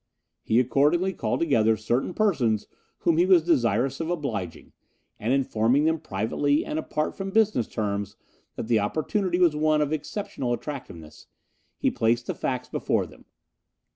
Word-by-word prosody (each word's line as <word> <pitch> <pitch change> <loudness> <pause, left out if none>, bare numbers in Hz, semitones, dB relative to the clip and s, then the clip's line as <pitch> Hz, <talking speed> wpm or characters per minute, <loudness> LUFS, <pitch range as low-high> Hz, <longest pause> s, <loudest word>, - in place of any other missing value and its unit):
He 115 - +2
accordingly 150 +9 +2
called - - -2
together 115 -9 +3
certain 120 - -1
persons 130 - +1 0.4
whom 165 -2 +2
he 175 - +4
was 180 -4 +6
desirous 130 - +1
of 165 0 -3
obliging, 115 - -4 0.5
and 110 +4 -1
informing 130 +1 +2
them 160 0 +1
privately 130 +9 0
and 155 - -2
apart 155 -1 -2
from 195 0 -4
business 210 - +2
terms 100 -2 -3 0.4
that - - -4
the 115 -2 +3
opportunity 175 - -1
was 175 -4 +4
one 155 0 +2
of 150 0 0
exceptional 145 - -3
attractiveness, 110 - -8 0.5
he - - +1
placed 120 +2 +1
the - - -2
facts 125 -1 -3
before - - -1
them. - - -16
135 Hz, 150 wpm, -25 LUFS, 115-160 Hz, 0.5 s, was